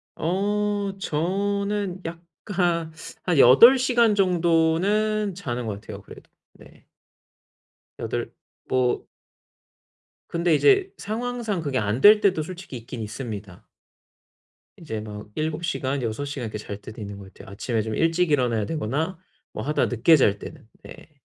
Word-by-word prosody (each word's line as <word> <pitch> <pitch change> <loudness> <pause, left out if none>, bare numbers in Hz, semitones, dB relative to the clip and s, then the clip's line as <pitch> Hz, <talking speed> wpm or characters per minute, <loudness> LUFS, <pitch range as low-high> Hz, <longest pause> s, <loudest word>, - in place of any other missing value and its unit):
어 205 +3 -1
저는 200 +3 -1
약간 170 0 -2 0.3
한 175 -4 +1
8 140 - +8
시간 240 -4 +3
정도는 185 +3 +2
자는 125 -10 -4
것 100 -2 -4
같아요, 105 -1 -9
그래도. - - -14 0.3
예. - - -18 1.1
8, - - -3 0.4
뭐 125 -1 +1 1.2
근데 170 -1 +1
이제 390 - +4
상황상 225 -2 -3
그게 140 -4 -2
안 105 +4 -1
될 210 +1 +8
때도 190 -6 +2
솔직히 180 -4 -8
있긴 115 +1 -8
있습니다. 105 -4 -7 1.1
이제 130 -10 -5
막 105 -1 -9
7시간, 155 -3 -2
6시간 125 +3 -4
이렇게 105 -1 -5
잘 105 -1 -7
때도 110 +3 -10
있는 100 -1 -7
것 95 -1 -12
같아요. - - -13
아침에 110 +3 -2
좀 110 0 -4
일찍 165 0 +1
일어나야 120 -6 +1
되거나 160 - -2 0.3
뭐 110 - -5
하다 150 +5 +1
늦게 125 +7 +4
잘 105 -9 +3
때는. - - -11 0.2
네. - - -14
160 Hz, 240 characters per minute, -24 LUFS, 120-195 Hz, 1.2 s, 8